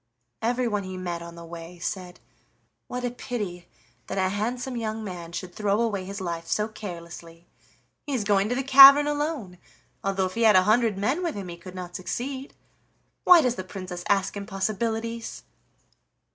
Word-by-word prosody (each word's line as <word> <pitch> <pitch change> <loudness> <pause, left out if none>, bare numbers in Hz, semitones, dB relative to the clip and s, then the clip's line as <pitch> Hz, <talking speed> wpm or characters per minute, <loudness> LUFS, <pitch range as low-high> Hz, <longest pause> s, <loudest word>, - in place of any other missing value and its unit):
Everyone 235 -3 0
he 185 -1 -6
met 175 -2 -4
on 170 0 -9
the 170 0 -10
way 170 +1 -9
said: 180 +1 -5 0.7
"What 250 0 -4
a 245 - -1
pity 205 -8 -5 0.4
that - - -4
a 185 -1 +2
handsome 245 +6 -2
young 220 -1 -3
man 175 -4 -7
should 180 +1 -6
throw 205 +1 0
away 210 -5 0
his 200 +2 -6
life 170 -2 -4
so 210 0 0
carelessly! 170 -5 -9 0.6
He 285 - -1
is 230 - 0
going 200 0 +2
to 245 - 0
the 270 - -1
cavern 275 +2 +10
alone, 290 - -2 0.4
though 195 -1 0
if 185 - -4
he 230 - -3
had 220 -3 +6
a 185 - +7
hundred 220 0 +3
men 255 - 0
with 340 -3 -2
him 195 -3 -6
he 170 - -6
could 180 +2 -11
not 180 -1 -7
succeed. 260 +8 -5 0.7
Why 355 -2 +9
does 250 -2 +2
the 185 - -3
Princess 185 -2 -7
ask 195 -1 +2
impossibilities?" 220 +3 -3
200 Hz, 175 wpm, -26 LUFS, 180-235 Hz, 0.7 s, cavern